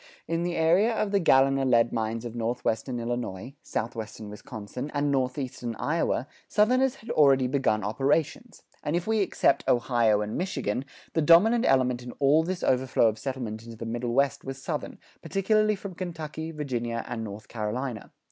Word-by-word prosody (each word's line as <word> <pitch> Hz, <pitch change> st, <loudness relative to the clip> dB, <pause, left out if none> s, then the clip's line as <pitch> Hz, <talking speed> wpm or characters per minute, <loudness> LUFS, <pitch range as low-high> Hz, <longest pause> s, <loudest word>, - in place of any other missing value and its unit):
In 165 Hz, +1 st, -1 dB
the 175 Hz, 0 st, -1 dB
area 175 Hz, +8 st, +4 dB
of 210 Hz, -2 st, -1 dB
the 200 Hz, -, +3 dB
Galena 135 Hz, -4 st, +4 dB
lead 120 Hz, -3 st, +3 dB
mines 115 Hz, +1 st, -2 dB
of 120 Hz, -, -5 dB
northwestern 120 Hz, +1 st, -2 dB
Illinois, 120 Hz, -1 st, -4 dB
southwestern 110 Hz, -2 st, -5 dB
Wisconsin, 105 Hz, +5 st, -7 dB
and 145 Hz, 0 st, +1 dB
northeastern 130 Hz, -3 st, -2 dB
Iowa, 150 Hz, -3 st, -1 dB, 0.2 s
Southerners 255 Hz, +5 st, +3 dB
had 230 Hz, -, -8 dB
already 135 Hz, -3 st, +5 dB
begun 125 Hz, -5 st, +1 dB
operations; 145 Hz, -, -1 dB, 0.2 s
and 150 Hz, -, -1 dB
if 175 Hz, +1 st, -1 dB
we 220 Hz, 0 st, +1 dB
except 190 Hz, -7 st, +2 dB
Ohio 120 Hz, -4 st, +3 dB
and 105 Hz, 0 st, -3 dB
Michigan, 135 Hz, -, -2 dB, 0.3 s
the 160 Hz, -, +2 dB
dominant 200 Hz, +10 st, +5 dB
element 125 Hz, -2 st, +2 dB
in 125 Hz, 0 st, -8 dB
all 145 Hz, +3 st, +4 dB
this 180 Hz, +2 st, -3 dB
overflow 130 Hz, -3 st, +3 dB
of 110 Hz, 0 st, -6 dB
settlement 115 Hz, -4 st, -4 dB
into 115 Hz, -1 st, -10 dB
the 115 Hz, -, -6 dB
Middle 120 Hz, +1 st, -3 dB
West 140 Hz, 0 st, +1 dB
was 135 Hz, 0 st, -6 dB
Southern, -, -, -4 dB, 0.2 s
particularly 215 Hz, +2 st, +2 dB
from 195 Hz, -1 st, -8 dB
Kentucky, 160 Hz, -3 st, -5 dB
Virginia, 120 Hz, -7 st, -3 dB
and 115 Hz, -2 st, -4 dB
North 105 Hz, 0 st, -8 dB
Carolina. 115 Hz, +2 st, -4 dB
130 Hz, 165 wpm, -27 LUFS, 115-165 Hz, 0.3 s, already